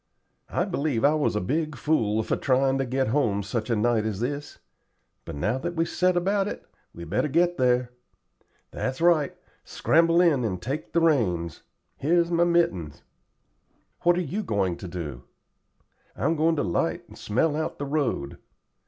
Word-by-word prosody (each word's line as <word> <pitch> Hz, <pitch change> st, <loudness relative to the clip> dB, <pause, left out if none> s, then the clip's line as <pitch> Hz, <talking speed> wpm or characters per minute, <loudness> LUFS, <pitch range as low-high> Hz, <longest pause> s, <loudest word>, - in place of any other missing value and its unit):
"I -, -, 0 dB
believe 140 Hz, -4 st, 0 dB
I 145 Hz, -, +5 dB
was 150 Hz, -7 st, 0 dB
a -, -, +1 dB
big 155 Hz, -, -1 dB
fool 110 Hz, -6 st, +1 dB
for -, -, 0 dB
tryin' 135 Hz, 0 st, +1 dB
to 135 Hz, -, 0 dB
get 130 Hz, 0 st, 0 dB
home 110 Hz, -6 st, +1 dB
such 110 Hz, +4 st, -3 dB
a 115 Hz, -, +2 dB
night 110 Hz, 0 st, +2 dB
as 110 Hz, -3 st, -3 dB
this; 145 Hz, +5 st, -4 dB, 0.7 s
but -, -, -7 dB
now 105 Hz, -, -1 dB
that 175 Hz, +4 st, -4 dB
we've 165 Hz, 0 st, +1 dB
set 180 Hz, 0 st, +1 dB
about 195 Hz, +3 st, +1 dB
it, -, -, -6 dB, 0.3 s
we'd 85 Hz, -1 st, -10 dB
better 105 Hz, -, +1 dB
get 175 Hz, +4 st, +2 dB
there. 125 Hz, -1 st, +2 dB, 0.8 s
That's 130 Hz, 0 st, -3 dB
right. 165 Hz, -4 st, +3 dB, 0.3 s
Scramble 165 Hz, +1 st, +2 dB
in 160 Hz, -8 st, +4 dB
and 95 Hz, -5 st, -2 dB
take 135 Hz, -, -5 dB
the 170 Hz, -, +3 dB
reins. 95 Hz, -, +1 dB, 0.4 s
Here's 170 Hz, +3 st, +2 dB
my 170 Hz, 0 st, +3 dB
mittens." 100 Hz, -, 0 dB, 1.0 s
"What 175 Hz, 0 st, +3 dB
are -, -, +1 dB
you 180 Hz, +6 st, -3 dB
going 100 Hz, -, 0 dB
to 95 Hz, -, -8 dB
do?" 80 Hz, -8 st, -6 dB, 0.9 s
"I'm 145 Hz, -, 0 dB
going 160 Hz, +1 st, +2 dB
to 145 Hz, -, 0 dB
'light 85 Hz, -, -1 dB
and -, -, -14 dB
smell 145 Hz, +8 st, 0 dB
out 155 Hz, +1 st, -3 dB
the 145 Hz, -, -4 dB
road. 140 Hz, -, -2 dB
135 Hz, 170 wpm, -26 LUFS, 105-165 Hz, 1.0 s, I